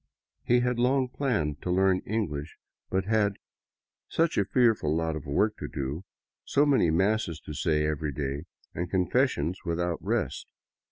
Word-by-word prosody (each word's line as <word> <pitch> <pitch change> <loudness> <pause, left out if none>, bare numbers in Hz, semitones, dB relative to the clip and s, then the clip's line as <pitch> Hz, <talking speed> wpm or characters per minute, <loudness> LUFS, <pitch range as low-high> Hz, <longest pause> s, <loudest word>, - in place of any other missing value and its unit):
He 120 0 +3
had 125 -1 0
long 130 +1 +2
planned 105 - -1
to - - -4
learn 95 +1 +3
English, 80 -9 -3 0.3
but 95 0 0
had 105 -1 +2 0.4
'' - - -65
such 165 0 +3
a 100 - +3
fearful 105 - +2
lot 80 -1 0
of 80 0 -7
work 105 +9 +2
to - - -5
do, 70 +6 -4 0.4
so 145 - +3
many 135 - +4
masses 95 +1 +1
to 75 - -8
say 75 0 +1
every 75 0 -1
day 70 +2 -3 0.3
and 85 +1 -3
con 90 -1 +1
fessions 90 - +1
without 85 -1 -2
rest." - - -1
90 Hz, 165 wpm, -28 LUFS, 75-110 Hz, 0.4 s, many